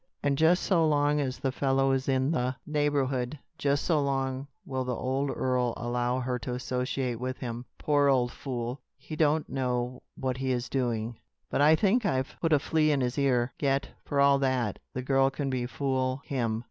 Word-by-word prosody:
And 140 -1 +2
just 160 +5 +4
so 175 -4 +3
long 150 -1 +3
as 130 -2 -2
the 135 0 -1
fellow 135 0 +2
is 135 0 0
in 130 +2 +2
the 130 -4 0
neighborhood, 145 -3 0 0.2
just 140 0 +1
so 160 -4 +2
long 135 -1 -1 0.2
will 130 -1 -2
the 125 -1 -2
old 135 +4 -1
earl 125 -3 0
allow 120 +1 -1
her 125 0 -2
to 125 +2 -4
associate 125 -1 -2
with 130 +1 -3
him. 120 -1 -5
Poor 145 -1 +2
old 125 -3 +3
fool! 125 -1 -4 0.2
He 150 +3 -8
don't 155 0 +2
know 125 -1 -2
what 130 -1 -2
he 130 0 -1
is 120 -1 -2
doing. 120 -3 -1 0.3
But - - +1
I 155 +2 +7
think 215 +7 +2
I've 130 -9 0
put 165 - +1
a 150 - +6
flea 155 +2 +1
in 140 -2 +1
his 125 +2 -1
ear. 125 -3 +2
Yet, 140 -1 +1
for 140 - -1
all 140 0 +5
that, 130 -6 0
the 130 - -4
girl 135 +1 +3
can 135 0 -3
befool 130 +1 -1
him. 115 -5 -1
135 Hz, 190 wpm, -28 LUFS, 125-140 Hz, 0.3 s, I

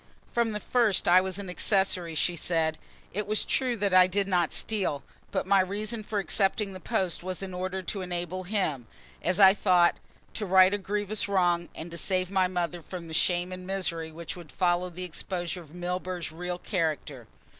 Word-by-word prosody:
"From 235 -2 +1
the 210 - -3
first 230 -4 +1
I 180 +1 +7
was 190 0 -1
an 200 -1 -6
accessory," 180 -2 +1
she 175 +2 +1
said. 160 -1 0 0.3
"It 205 +2 -3
is 215 - +1
true 255 -3 0
that 200 -2 0
I 185 0 +7
did 195 +1 0
not 175 -4 +1
steal, 190 -10 -1 0.3
but - - -1
my 200 - +4
reason 210 +4 -1
for 210 0 -4
accepting 195 0 +1
the 185 - -8
post 190 -5 -1
was 185 +1 -4
in 190 -1 -6
order 185 +1 -3
to 195 +3 -4
enable 180 0 -4
him, 170 - -1 0.3
as 185 +2 +1
I 190 -1 +9
thought, 180 -4 +4 0.4
to 210 - -3
right 185 +1 +6
a 205 - 0
grievous 205 +1 -1
wrong 175 -3 +2
and 165 +2 -7
to 170 - -3
save 185 0 0
my 190 -2 +3
mother 175 -1 -2
from 170 +1 -8
the 160 - -8
shame 175 +2 +1
and 185 0 -7
misery 170 -4 -2
which 165 0 -7
would 175 -4 -11
follow 180 0 +1
the 180 +1 -7
exposure 180 +1 -4
of 160 0 -15
Milburgh's 180 -1 -3
real 180 +2 -4
character." 155 - -2
185 Hz, 195 wpm, -28 LUFS, 175-195 Hz, 0.4 s, I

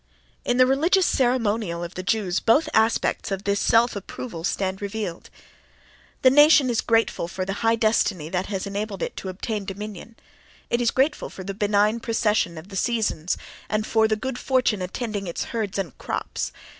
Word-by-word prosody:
In 245 - 0
the 255 - +7
religious 325 +8 +3
ceremonial 225 - +1
of 170 +1 -6
the 185 - -5
Jews 190 -2 0
both 260 +8 +3
aspects 220 +1 +2
of 195 0 -3
this 200 -1 0
self 230 +2 +3
approval 200 -2 -7
stand 190 +1 -1
revealed. 200 -4 -5 0.9
The 255 - +7
nation 295 -2 +6
is 230 - +1
grateful 225 -6 +1
for 185 +1 -4
the 195 - -2
high 225 0 +3
destiny 215 -7 +1
that 185 +2 -2
has 195 -2 -3
enabled 200 -1 -4
it - - -4
to 190 - -5
obtain 205 +3 -4
dominion; 205 +2 -7 0.6
it 235 +1 +2
is 235 - +3
grateful 280 +5 0
for 190 - -9
the 195 +1 -4
benign 210 +2 +2
procession 215 -7 0
of 160 +5 -10
the 195 - -9
seasons, 210 -6 0 0.3
and 215 0 0
for 220 0 +3
the 215 - +1
good 250 +3 -4
fortune 250 -6 +1
attending 205 +1 -4
its 170 - -3
herds 215 -4 -2
and 195 -4 -2
its - - -26
crops. - - -3
215 Hz, 180 wpm, -24 LUFS, 190-235 Hz, 0.9 s, the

